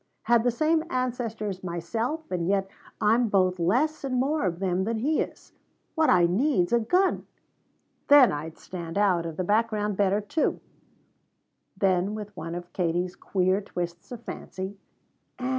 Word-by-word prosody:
"Had 235 -1 +3
the 245 - +3
same 310 +6 +1
ancestors 230 - -3
myself, 225 - -2
and 175 -2 -1
yet 195 0 +1 0.3
I'm 225 +2 +3
both 185 -2 +2
less 255 - +1
and 265 -2 -2
more 285 0 +1
of 170 -2 -2
them 185 0 0
than 225 +3 -1
he 290 +8 +1
is. - - -7 0.4
What 320 -1 +2
I 175 -1 +5
need's 190 - +1
a 235 - +5
gun! 360 - +1 0.8
Then 285 -3 +8
I'd 155 +2 -5
stand 170 -1 -7
out 185 -5 +2
of 160 -2 -7
the 185 - 0
background 210 0 +1
better, 200 0 +2
too." 215 +10 -1 1.2
Then 190 +1 +1
with 210 -1 -7
one 170 -1 -5
of 175 0 -8
Katie's 180 +1 -1
queer 190 0 0
twists 175 -2 -6
of 235 -1 -8
fancy 190 -2 -6 0.6
Ann! 250 0 -3
205 Hz, 160 wpm, -26 LUFS, 180-240 Hz, 1.2 s, Then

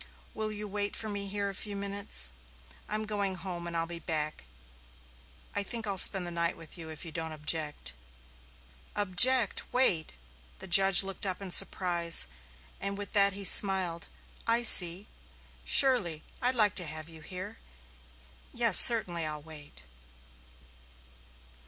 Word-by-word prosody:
"Will 215 0 -4
you 210 0 -9
wait 205 0 -5
for 220 - -7
me 200 -1 -6
here 200 0 -6
a 200 - -7
few 205 +1 -8
minutes? 200 - -4 0.6
I'm 215 +1 -5
going 200 -3 -5
home 175 -1 -9
and 170 -1 -6
I'll 165 - -2
be 170 0 -7
back. 155 - -5 1.1
I - - -1
think 225 +2 -5
I'll 200 -2 0
spend 190 0 +7
the 175 - -8
night 170 0 -4
with 165 -2 -10
you 165 -3 -11
if 160 +2 -11
you 165 - -9
don't 160 0 -6
object." 150 - -6 1.0
"Object! 210 +4 +4
Wait!" 190 -11 0 0.4
The - - -12
judge 195 +1 +4
looked 195 +1 -6
up 185 - -4
in 195 -2 -9
surprise, 170 - +4 0.5
and 200 0 -5
with 205 0 -10
that 200 -1 +3
he 200 +1 -7
smiled. 185 -3 +4 0.4
"I 230 +1 +1
see. 180 -3 +5 0.6
Surely. 175 - +1 0.2
I'd 250 +1 0
like 210 -4 +3
to 180 - -1
have 155 +1 -9
you 160 -1 -14
here. 185 +7 -11 0.9
Yes, 230 -5 +4
I'll - - +11
certainly 170 -7 -5 0.2
wait." 150 - -14
190 Hz, 150 wpm, -27 LUFS, 165-205 Hz, 1.1 s, I'll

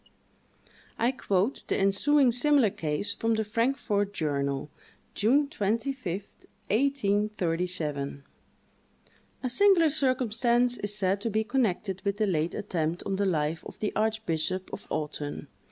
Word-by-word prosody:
I 235 +2 +2
quote 205 -1 0
the - - 0
ensuing 250 +8 +3
similar 250 -2 +3
case 155 +4 -1
from 225 0 0
the 220 - 0
"Frankfort 215 -2 0
Journal," 140 -2 -1 0.4
June 275 +8 +3
25, 230 - -2 0.6
1837: 185 - 0 1.2
"A - - +1
singular 340 +2 +5
circumstance 245 -3 +1
is 205 0 -3
said 195 -1 +1
to 230 - -1
be 220 +1 +1
connected 210 -6 -1
with 200 0 -1
the 215 - +2
late 165 -4 0
attempt 170 -3 -2
on 195 - -1
the 200 - +1
life 160 -2 0
of - - -11
the 210 - -2
archbishop 185 -5 -1
of - - -7
Autun. 150 -1 -4
205 Hz, 125 wpm, -28 LUFS, 175-245 Hz, 1.2 s, singular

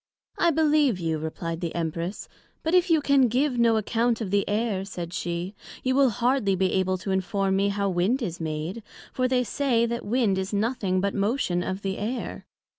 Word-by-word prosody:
I 340 - +4
believe 300 - +3
you, 160 -2 -1
replied 165 +2 -4
the 170 -2 -3
Empress; 170 +3 -3 0.4
but 320 - -1
if 360 0 +4
you 320 -2 +4
can 280 -3 +4
give 250 +2 +1
no 230 -1 +4
account 230 +2 +1
of 210 -5 -4
the 200 0 +1
Air, 210 -2 0
said 175 -3 -6
she, 175 +2 -3 0.3
you 260 - +1
will 270 -1 +5
hardly 235 -3 +1
be 185 0 +1
able 185 0 +1
to 190 +2 -4
inform 190 +1 0
me 200 +1 +2
how 200 0 -1
Wind 195 +8 +1
is 175 -5 -4
made; 160 +7 -3 0.3
for 255 0 +1
they 250 -1 +2
say, 245 -1 +1
that 235 0 -3
Wind 210 -3 +1
is 190 +2 -4
nothing 200 -3 0
but 200 0 0
motion 200 -3 0
of 190 +2 -4
the 195 0 -2
Air. 235 +5 -4
205 Hz, 195 wpm, -26 LUFS, 185-250 Hz, 0.4 s, will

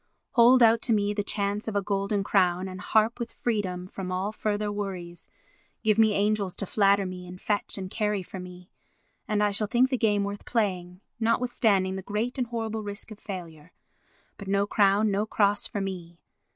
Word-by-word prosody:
"Hold 245 +1 +6
out 225 0 +5
to 235 - +1
me 205 -1 +1
the 205 - -1
chance 205 +1 -2
of 220 - -3
a 200 - +2
golden 200 0 -1
crown 185 -2 +2
and 185 -1 -7
harp 220 +3 +2
with 235 -1 -4
freedom 190 -6 -2
from 185 0 -6
all 185 +3 -1
further 210 -1 -2
worries, 185 -4 -5 0.5
give 215 -1 +3
me 220 -1 +5
angels 200 -2 0
to 200 - -3
flatter 200 0 +3
me 180 -1 -7
and 180 +1 -10
fetch 210 0 -1
and 190 -1 -4
carry 210 -1 -1
for 190 - -9
me, 180 0 -11 0.6
and 210 -1 +1
I 205 - +2
shall 210 +1 +1
think 250 +5 +3
the 255 - +1
game 205 -3 +2
worth 200 0 -5
playing, 185 -5 -2 0.2
notwithstanding 225 -5 +1
the - - -4
great 215 +7 -3
and 245 - 0
horrible 225 -2 -3
risk 205 +1 -6
of 215 - -10
failure; 175 -4 -8 0.7
but 200 - -8
no 200 +1 +2
crown, 205 0 +3
no 205 +2 0
cross 205 -1 +2
for 205 - -4
me. 175 -3 -6
205 Hz, 190 wpm, -27 LUFS, 190-215 Hz, 0.7 s, Hold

